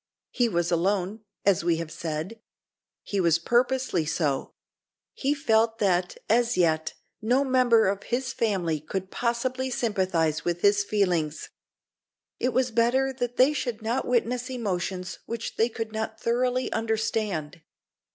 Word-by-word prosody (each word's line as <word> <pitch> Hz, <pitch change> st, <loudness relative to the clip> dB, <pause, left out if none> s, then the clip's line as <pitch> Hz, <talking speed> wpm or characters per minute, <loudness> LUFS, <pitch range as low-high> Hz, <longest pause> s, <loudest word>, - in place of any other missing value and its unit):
He 245 Hz, -2 st, +1 dB
was 175 Hz, -3 st, 0 dB
alone, 195 Hz, +4 st, 0 dB, 0.2 s
as 195 Hz, -4 st, +3 dB
we 170 Hz, -1 st, +2 dB
have 165 Hz, -1 st, -5 dB
said. 165 Hz, +6 st, -4 dB, 0.6 s
He 200 Hz, -, -2 dB
was 170 Hz, -3 st, +4 dB
purposely 240 Hz, -1 st, +1 dB
so. 150 Hz, -3 st, -1 dB, 0.6 s
He 285 Hz, +2 st, 0 dB
felt 225 Hz, -5 st, +2 dB
that, 180 Hz, -4 st, +1 dB
as 235 Hz, -1 st, +2 dB
yet, 160 Hz, -3 st, +1 dB, 0.3 s
no 245 Hz, +5 st, +2 dB
member 250 Hz, -5 st, +4 dB
of 200 Hz, +1 st, -1 dB
his 250 Hz, +3 st, -2 dB
family 185 Hz, -10 st, 0 dB
could 190 Hz, +5 st, -5 dB
possibly 255 Hz, +2 st, -1 dB
sympathise 185 Hz, -10 st, 0 dB
with 175 Hz, 0 st, -2 dB
his 205 Hz, 0 st, +4 dB
feelings. 175 Hz, -7 st, 0 dB, 0.9 s
It 250 Hz, -, +1 dB
was 255 Hz, 0 st, +1 dB
better 245 Hz, +4 st, +2 dB
that 245 Hz, -1 st, -3 dB
they 265 Hz, +4 st, +5 dB
should 240 Hz, -6 st, -3 dB
not 235 Hz, +4 st, -1 dB
witness 245 Hz, +1 st, 0 dB
emotions 190 Hz, -6 st, -3 dB
which 230 Hz, 0 st, -4 dB
they 225 Hz, +2 st, +2 dB
could 225 Hz, -1 st, -5 dB
not 220 Hz, 0 st, -4 dB
thoroughly 250 Hz, +2 st, 0 dB
understand. 215 Hz, -7 st, -2 dB
220 Hz, 140 wpm, -26 LUFS, 180-245 Hz, 0.9 s, they